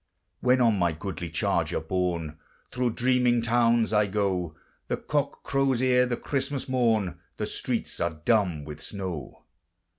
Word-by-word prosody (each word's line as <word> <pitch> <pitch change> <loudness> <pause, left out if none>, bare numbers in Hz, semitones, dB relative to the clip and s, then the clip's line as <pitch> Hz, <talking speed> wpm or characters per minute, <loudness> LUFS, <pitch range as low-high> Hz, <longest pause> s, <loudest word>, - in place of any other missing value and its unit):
When 125 0 +3
on 115 -4 +4
my 85 -2 +2
goodly 85 0 -5
charger - - 0
borne 85 -2 -2 0.3
Thro' 125 0 0
dreaming 125 0 +2
towns 115 -1 +3
I 105 -1 +4
go, 95 -5 -1 0.3
The - - -1
cock - - -2
crows 135 -3 +1
ere 125 0 +4
the 120 -1 -1
Christmas 140 0 -2
morn, 115 -7 +1 0.2
The - - -1
streets - - -3
are 85 -2 -2
dumb 95 -10 +2
with 75 -1 -8
snow. 95 -7 -6
110 Hz, 145 wpm, -27 LUFS, 90-125 Hz, 0.3 s, on